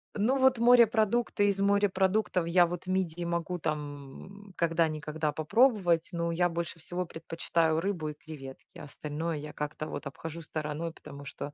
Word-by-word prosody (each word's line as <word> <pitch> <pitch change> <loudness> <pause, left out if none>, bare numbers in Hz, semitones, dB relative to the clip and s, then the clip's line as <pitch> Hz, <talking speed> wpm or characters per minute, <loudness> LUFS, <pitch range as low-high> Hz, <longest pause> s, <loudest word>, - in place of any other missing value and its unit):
Ну, 245 +6 +2
вот 260 -1 +5
морепродукты, 230 -2 +4
из 195 -1 -1
морепродуктов 195 -2 +2
я 175 +1 +5
вот 175 +1 -6
мидии 180 -2 -1
могу 170 +1 -2
там, 150 +6 -6
м, 195 - -15
когда-никогда 160 -2 0
попробовать, 175 - +3
но 170 0 -1
я 175 +1 +2
больше 170 0 -4
всего 175 +3 -3
предпочитаю 165 -1 0
рыбу 170 -4 -2
и - - -5
креветки, 140 -4 -11
остальное 150 +3 -4
я 150 +1 -7
как-то 150 +1 -4
вот 145 -2 -5
обхожу 165 +4 -7
стороной, 155 +1 -4
потому 145 -3 -11
что 145 +1 -7
170 Hz, 150 wpm, -30 LUFS, 155-195 Hz, -, вот